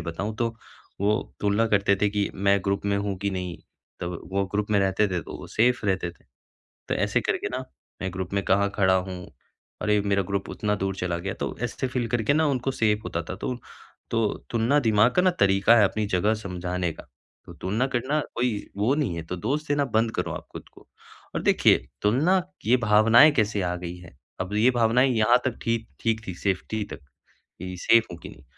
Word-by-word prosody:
लिए - - -9
बताऊँ 105 +5 -4
तो 115 0 -1 0.5
वो 105 +1 +3 0.3
तुलना 105 +2 +2
करते 100 -1 +3
थे 105 - +3
कि 105 -1 0
मैं 100 +1 +3
ग्रुप 100 0 -1
में 100 0 +1
हूँ 100 -1 -2
कि 100 +1 -1
नहीं। 90 -2 -4 0.4
तब 85 -1 -4
वो 100 0 +1
ग्रुप 105 +1 -1
में 100 - +4
रहते 95 +2 +2
थे 90 -2 -1
तो - - -8
वो - - -9
सेफ 120 0 +1
रहते 95 -3 0
थे। - - -24 0.6
तो - - +1
ऐसे - - +1
करके - - -1
ना - - -3 0.4
मैं 95 - -2
ग्रुप 95 0 -5
में 100 - +1
कहाँ 100 +1 +3
खड़ा 95 -2 +3
हूँ, 90 -1 -3 0.5
अरे 105 0 +2
मेरा 100 -1 +1
ग्रुप 100 -1 -2
उतना 105 -1 -1
दूर 95 -1 -2
चला 90 -2 -2
गया 95 +2 -4
तो - - -3
ऐसे 125 +2 -2
फ़ील 125 -2 -2
करके 120 +3 +1
ना 155 0 +3
उनको 135 -1 0
सेफ 105 -4 0
होता - - -3
था - - -3
तो 125 - -3 0.6
तो 115 -1 +1 0.3
तुलना 120 +5 +2
दिमाग 110 0 +4
का 180 - +4
ना 185 - +5
तरीका 100 +3 +5
है 105 - +6
अपनी 105 +2 0
जगह 105 +3 +1
समझाने 90 -3 -3
का, - - -12 0.4
तो - - -10
तुलना 110 +8 -1
करना 130 +4 -1 0.2
कोई 125 +1 +1 0.3
वो 110 +7 +2
नहीं 140 - -1
है 85 - -4
तो 90 - -4
दोष 145 - -2
देना 145 0 +1
बंद 115 -2 +1
करो - - -2
आप - - -7
खुद - - -9
को। - - -18 0.5
और - - -2
देखिए - - +5 0.3
तुलना, 155 - +3 0.2
ये 125 - +5
भावनाएँ 115 +5 +6
कैसे 105 -6 +1
आ 90 0 -1
गई 90 0 -6
है, 85 -7 -14 0.2
अब 95 +3 -3
ये 115 +5 +4
भावनाएँ 125 +2 +3
यहाँ 110 +3 +5
तक 125 -3 -2
ठीक 115 -1 -1
ठीक 115 -1 -1
थी 95 - -4
सेफटी 100 +3 -2
तक - - -8 0.6
कि 90 0 -6
सेफ 115 -1 +5
हूँ 85 - -8
कि - - -8
नहीं। 70 - -15
105 Hz, 215 wpm, -25 LUFS, 95-115 Hz, 0.6 s, है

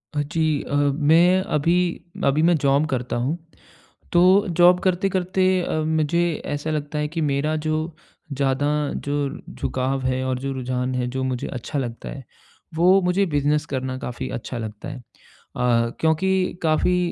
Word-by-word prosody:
जी 155 0 0
अ, 145 - -3
मैं 155 +6 +4
अभी 165 +1 +1 0.5
अभी 140 +3 +3
मैं 170 +1 +5
जॉब 140 +1 +2
करता 125 -2 -2
हूँ, 130 +8 -1 0.8
तो 185 +4 +5
जॉब 175 +1 +5
करते-करते 185 0 +1 0.2
अ, - - -2
मुझे 160 +1 0
ऐसा 145 +2 -3
लगता 150 0 -3
है 150 0 -1
कि 165 +2 -4
मेरा 150 +1 0
जो 155 +1 -2 0.4
ज़्यादा 135 0 0 0.4
जो 145 - -1 0.4
झुकाव 130 +1 -2
है 130 0 0
और 130 -1 -1
जो 135 +1 -3
रुझान 130 0 -2
है, 125 -1 -1
जो 130 +1 -3
मुझे 130 -2 -2
अच्छा 130 +4 -4
लगता 120 -3 -4
है, 135 - -8 0.5
वो 180 +4 +5
मुझे 180 +2 +2
बिज़नेस 150 -1 +1
करना 130 -2 -3
काफ़ी 125 -1 -5
अच्छा 120 +1 -5
लगता 110 +4 -7
है। 145 - -6 0.6
अ, 120 -1 +2
क्योंकि 180 +3 +1
काफ़ी 165 +3 +2
150 Hz, 155 wpm, -23 LUFS, 130-170 Hz, 0.8 s, मैं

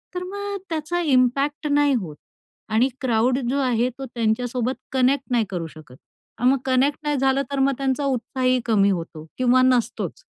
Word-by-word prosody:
तर 360 - -3
मग 405 +2 -5
त्याचा 325 +2 -2
इम्पॅक्ट 275 +1 +1
नाही 290 -1 +3
होत 185 - -3 0.6
आणि 240 +5 +3
क्राउड 250 0 +2
जो 275 +2 0
आहे 250 -2 +1
तो 270 - -5
त्यांच्यासोबत 245 +1 -1 0.2
कनेक्ट 265 +1 +2
नाही 235 -3 +2
करू 175 -4 -4
शकत. 155 -5 -14 0.4
अन् 250 +2 +3
मग 270 - +3
कनेक्ट 265 +2 +2
नाही 295 -1 0
झालं 270 +1 +2
तर 280 - -1
मग 270 +1 +3
त्यांचा 275 +1 -1
उत्साहही 255 -1 0
कमी 205 -4 +3
होतो 165 -4 -4
किंवा 255 0 +4
नसतोच. 255 - 0
255 Hz, 170 wpm, -23 LUFS, 235-280 Hz, 0.6 s, किंवा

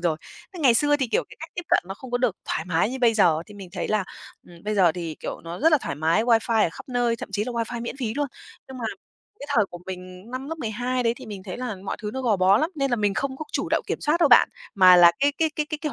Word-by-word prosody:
rồi. 170 -3 0 0.4
Thế 345 - -7
ngày 250 -5 +5
xưa 290 +3 +3
thì, 265 -3 -1
kiểu, - - +1
cái - - -14
cách 325 - -8
tiếp 350 - -4
cận - - +4
nó 195 - -5
không 255 +4 -11
có 245 - 0
được 245 -6 0
thoải 160 - -1
mái 175 +5 +1
như 265 - -4
bây 235 -3 +3
giờ, 165 -6 +3
thì 210 - -13
mình 195 -3 -10
thấy 180 - -3
là, 215 -3 +1 0.4
ừm, 170 -1 -15
bây 215 0 -1
giờ 180 -5 +4
thì, 165 -3 -5
kiểu, - - -5
nó 170 +1 -6
rất 320 +2 +4
là 305 - +6
thoải - - -4
mái, 165 +9 +1
wifi 230 -2 +3
ở - - +1
khắp - - -12
nơi, 240 -2 +1
thậm - - -7
chí 205 +2 0
là 250 - -4
wifi 235 0 -3
miễn 240 - -5
phí 235 -4 -3
luôn. 290 0 0 0.4
Nhưng 260 -1 -9
mà 235 - -5 0.6
cái 285 - -7
thời 215 - +5
của 175 - -8
mình 185 +3 -9
năm 260 +3 -5
lớp 325 0 -5
12 245 +2 -2
đấy 230 0 +1
thì - - -11
mình 200 -3 -7
thấy 185 -2 -6
là 245 -5 -4
mọi - - -3
thứ 210 - -3
nó 265 - -3
gò 220 -5 +2
bó 190 +3 +4
lắm, 320 +3 0
nên 275 -3 -1
là 240 - +2
mình 205 -2 0
không 265 +3 -2
có 310 - -6
chủ - - -1
động - - +1
kiểm - - -3
soát 320 +4 +1
đâu 315 - +5
bạn, 240 - +7 0.3
mà 185 -2 +8
là 170 -1 +8
cái 285 +1 +3
cái 320 -1 +2
cái 300 -1 -1
cái 310 -1 -4
cái 300 -3 -3
230 Hz, 310 wpm, -24 LUFS, 190-265 Hz, 0.6 s, mà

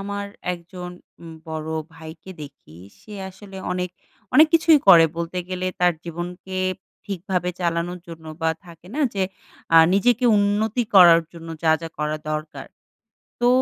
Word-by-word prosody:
আমার 200 0 -4 0.3
একজন 180 +1 -9 0.3
উম 165 -1 -10 0.2
বড়ো 160 0 -4 0.2
ভাইকে 160 +3 -11
দেখি 135 - -13 0.2
সে 215 - -14 0.2
আসলে 195 0 -13 0.2
অনেক, 180 0 -3 0.4
অনেক 310 +1 +8
কিছুই 320 -1 +6
করে 165 -1 +9
বলতে 170 +2 -3
গেলে 185 0 -3
তার 180 0 +4
জীবনকে 175 +2 -6 0.5
ঠিকভাবে 180 -2 -2
চালানোর 175 +1 -2
জন্য 165 -1 -10 0.2
বা 160 - +3 0.2
থাকে 170 0 -15
না? 310 - -2
যে 195 - 0 0.5
আ - - +8 0.2
নিজেকে 245 +4 +2
উন্নতি 210 +4 +1
করার 170 -3 +8
জন্য 165 -1 -11
যা, 160 -1 +4
যা 165 - -5
করা 150 0 -1
দরকার। 155 0 -5 0.7
তো 240 - +3
180 Hz, 145 wpm, -22 LUFS, 165-195 Hz, 0.7 s, করে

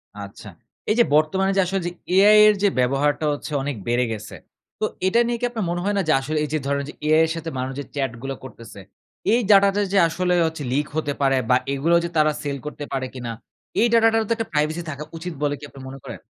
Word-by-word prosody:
আচ্ছা, 100 +1 -10 0.4
এই 215 - +3
যে - - +8
বর্তমানে 190 +6 +2
যে 195 - +5
আসলে 190 +2 -2
যে - - -3 0.2
AI 210 +2 +7
এর 210 - +6
যে - - +6
ব্যবহারটা 140 +4 +1
হচ্ছে 145 - -7
অনেক 140 0 -3
বেড়ে 120 +1 +2
গেছে। 110 0 -7 0.4
তো 215 - +1 0.2
এটা 230 +5 +3
নিয়ে 240 0 -1
কি 245 - +1
আপনার 220 -5 -3
মনে 175 - -2
হয় 205 0 0
না - - +3
যে 155 - +4
আসলে 155 +3 -3
এই 150 - -3
যে 155 - +1
ধরনের 140 0 -1
যে - - -8
AI 155 +1 +5
এর - - -4
সাথে 165 0 -5
মানুষ 130 +1 -3
যে 145 - -4
chat 135 -4 -1
গুলো 135 0 -4
করতেছে 115 -5 -11 0.5
এই 240 - +4
data 200 0 +7
টা 205 - +2
যে 200 - +3
আসলেও 180 +1 +1
হচ্ছে 160 -2 -5
leak 145 +3 0
হতে 145 -2 -1
পারে 135 -1 +3
বা 125 - +6 0.2
এগুলো 160 +5 +2
যে 170 - -2
তারা 155 0 +4
sale 140 -2 -4
করতে 150 0 -6
পারে 135 -1 -1
কিনা? 120 -3 -5 0.5
এই 235 - +5
data 230 -1 +6
টারও 225 0 +2
তো 230 - +3
একটা 225 -1 -4
privacy 155 +3 0
থাকা 145 0 -5
উচিত 175 +1 -6
বলে 145 -1 +1
কি - - -16
আপনি 135 - -13
মনে 135 +1 -9
করেন? - - -8
155 Hz, 245 wpm, -22 LUFS, 135-190 Hz, 0.5 s, যে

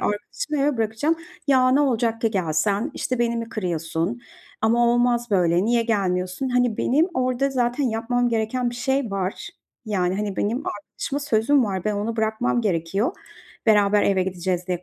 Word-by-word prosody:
arkadaşımı 290 - -3
eve 285 -2 +1
bırakacağım." 225 +9 0 0.3
"Ya, 260 -2 +4
ne 280 +3 +4
olacak 230 -4 +1
ki 225 - +1
gelsen, 195 - 0
işte, 255 -1 -2
beni 235 0 +1
mi 230 0 -4
kırıyorsun 175 +2 -2 0.4
ama 235 +2 +3
olmaz 240 -1 +1
böyle, 175 -1 +3
niye 235 0 +2
gelmiyorsun?" 190 +1 -1
Hani, 245 -3 +1
benim 305 +7 +2
orada 255 +1 0
zaten 250 +1 0
yapmam 240 +1 0
gereken 235 +2 -1
bir - - -8
şey 265 -1 -1
var, 195 -1 -3 0.4
yani, 185 -3 0
hani, 205 -2 -3
benim 225 +5 0
arkadaşıma 270 +7 -4
sözüm 260 0 +2
var, 190 -2 -3
ben 215 - 0
onu 215 +3 -2
bırakmam 220 +2 0
gerekiyor, 195 - 0 0.5
beraber 205 -1 +4
eve 190 -2 +2
gideceğiz 180 -1 -2
diye 180 0 -2
225 Hz, 160 wpm, -23 LUFS, 195-245 Hz, 0.5 s, Ya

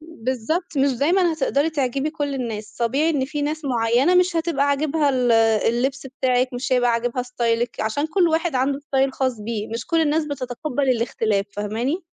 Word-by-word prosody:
بالضبط، 310 +2 -3
مش 275 0 +3
دايمًا 335 +7 +2
هتقدري 295 0 0
تعجبي 275 0 -1
كُلّ 290 -3 -3
الناس، 215 -5 -5
طبيعي 275 +8 +1
إن 275 -4 0
فيه 295 +1 -4
ناس 305 +1 -3
معيّنة 245 +6 +2
مش 360 -1 +3
هتبقى 325 -4 +1
عاجبها 290 +1 +1
ال 250 -2 +2 0.4
اللبْس 265 +4 -1
بتاعِك، 255 -1 0
مش 245 +1 -3
هيبقى 245 -1 +3
عاجبها 240 +2 -1
ستايلِك، 240 -1 -1
عشان 220 +8 -1
كُلّ 345 +1 +2
واحد 325 0 0
عنده 270 +2 +1
style 270 -2 0
خاص 260 -4 -1
بيه، 215 0 -4
مش 230 +1 -5
كُلّ 330 -2 +2
الناس 310 0 +1
بتتقبل 275 0 -3
الاختلاف، 220 -3 -1
فاهماني؟ 230 - -2
270 Hz, 175 wpm, -22 LUFS, 240-305 Hz, 0.4 s, مش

